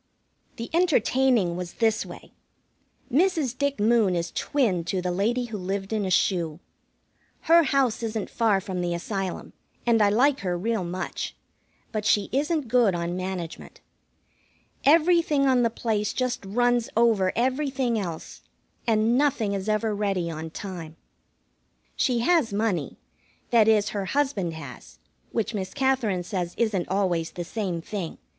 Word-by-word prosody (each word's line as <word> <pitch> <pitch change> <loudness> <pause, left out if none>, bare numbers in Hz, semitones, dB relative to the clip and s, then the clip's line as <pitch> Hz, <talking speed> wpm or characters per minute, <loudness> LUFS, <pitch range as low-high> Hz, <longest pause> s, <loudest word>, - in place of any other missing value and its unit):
The 230 - -7
entertaining 260 - +2
was 180 -1 -5
this 225 -2 +1
way. - - -11 0.8
Mrs. 315 -5 +2
Dick 280 -1 -1
Moon 215 -3 +3
is 170 0 -2
twin 220 -12 0
to 185 +2 -1
the 180 0 -2
lady 230 +7 0
who 220 -3 -6
lived 195 +2 -3
in 210 -2 0
a - - -1
shoe. 170 -4 +1 0.8
Her 335 +1 +6
house 265 -6 +1
isn't 220 -2 -3
far 220 -4 +2
from 190 -2 -4
the 175 -1 -1
Asylum, 190 +1 -4 0.3
and 230 -2 +3
I 205 - +5
like 265 +7 +3
her 180 -2 -2
real 220 +2 -1
much; 180 +1 -4 0.6
but 215 -2 -2
she 205 -1 +2
isn't 295 +1 0
good 225 -5 +3
on 170 0 -2
management. 185 -2 -6 1.1
Everything 315 -1 +4
on 260 -2 +4
the 230 - +3
place 220 -2 -1
just 255 -4 -2
runs 240 +3 +1
over 220 -5 +3
everything 260 -1 0
else, 170 -5 -6 0.5
and 225 +1 +3
nothing 245 -8 +1
is 195 +1 -3
ever 215 0 +1
ready 195 -5 -1
on 160 0 -6
time. 165 -3 -7 1.0
She 245 -3 +1
has 315 -3 +3
money 200 -7 -1 0.5
that 225 -3 +5
is, 210 -2 +4
her 200 -2 -3
husband 205 - -1
has, 160 - -10 0.3
which 225 0 -1
Miss 190 -3 -4
Katherine 260 -9 +1
says 175 -1 -3
isn't 215 -6 0
always 180 -4 0
the 175 - -4
same 180 -4 -3
thing. 190 -5 -5
215 Hz, 150 wpm, -25 LUFS, 185-245 Hz, 1.1 s, Her